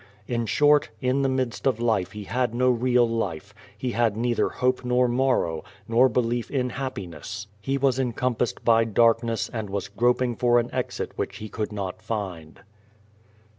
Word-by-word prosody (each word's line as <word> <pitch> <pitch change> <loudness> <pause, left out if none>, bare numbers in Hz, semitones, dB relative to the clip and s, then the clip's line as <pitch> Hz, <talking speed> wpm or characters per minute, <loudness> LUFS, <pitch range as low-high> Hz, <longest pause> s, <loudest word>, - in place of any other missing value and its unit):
In 115 -2 -1
short, 145 +2 +4
in 130 +3 +1
the 135 - +2
midst 130 0 -1
of 125 -4 +1
life 110 -5 0
he 105 0 -6
had 120 +2 -1
no 125 +1 +3
real 125 0 +3
life, 100 -4 -3 0.2
he 125 +3 -2
had 115 -3 +1
neither 120 +1 +1
hope 125 0 0
nor 125 0 +2
morrow, 120 -11 +1 0.2
nor 120 +3 +5
belief 120 0 0
in 125 -3 -1
happiness; 100 - -6
he 135 +6 -1
was 135 -1 +2
encompassed 125 -1 -1
by 115 -1 +5
darkness 115 +1 +2
and 110 -3 -4
was 100 0 -3
groping 120 +3 +1
for 120 +1 +3
an 120 +1 -3
exit - - -3
which - - -3
he 110 - -7
could 110 0 -3
not 100 -3 -5
find. 90 -8 -5
120 Hz, 170 wpm, -25 LUFS, 105-125 Hz, 0.2 s, nor